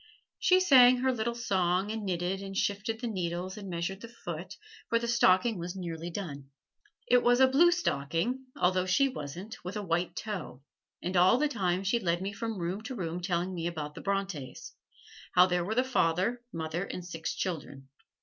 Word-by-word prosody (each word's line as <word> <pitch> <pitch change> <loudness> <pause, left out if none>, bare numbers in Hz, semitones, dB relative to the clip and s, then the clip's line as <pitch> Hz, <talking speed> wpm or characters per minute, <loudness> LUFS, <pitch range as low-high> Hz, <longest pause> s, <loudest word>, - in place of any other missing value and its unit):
She 370 0 +5
sang 255 -8 +7
her 260 0 +2
little 235 0 -2
song 190 -3 0
and 220 -1 -4
knitted 185 0 -1
and 195 -1 -6
shifted 215 +3 -1
the 245 - -2
needles 180 -2 -3
and 200 -2 -8
measured 175 +3 -3
the 230 - -7
foot, 175 -7 -7 0.3
for 230 - +3
the 235 0 -2
stocking 220 -2 +3
was 175 +2 -5
nearly 170 -2 -5
done. 145 -7 -6 0.6
It 245 0 +4
was 245 +1 +4
a 265 - +7
blue 310 +7 +5
stocking 245 - -1
(although 185 +1 +2
she 275 +10 +4
wasn't) 180 - -7
with 185 +4 -5
a 210 - -3
white 175 -1 -1
toe; 185 - -5 0.4
and 180 +2 -2
all 180 +6 +6
the 300 +3 +2
time 190 -8 -1
she 200 +5 +1
led 170 -4 0
me 195 +2 -4
from 225 0 -4
room 180 +3 -3
to 260 - -5
room 175 -4 -3
telling 180 0 -1
me 170 -1 -2
about 150 -3 -4
the - - -9
Brontes 195 -9 -3 0.6
how 180 0 +8
there 180 -1 0
were 215 +5 -2
the 250 - +3
father, 230 -1 +1
mother 165 0 -3
and 180 -2 -6
six 165 -2 -4
children. 145 -7 -4
190 Hz, 190 wpm, -30 LUFS, 175-230 Hz, 0.6 s, how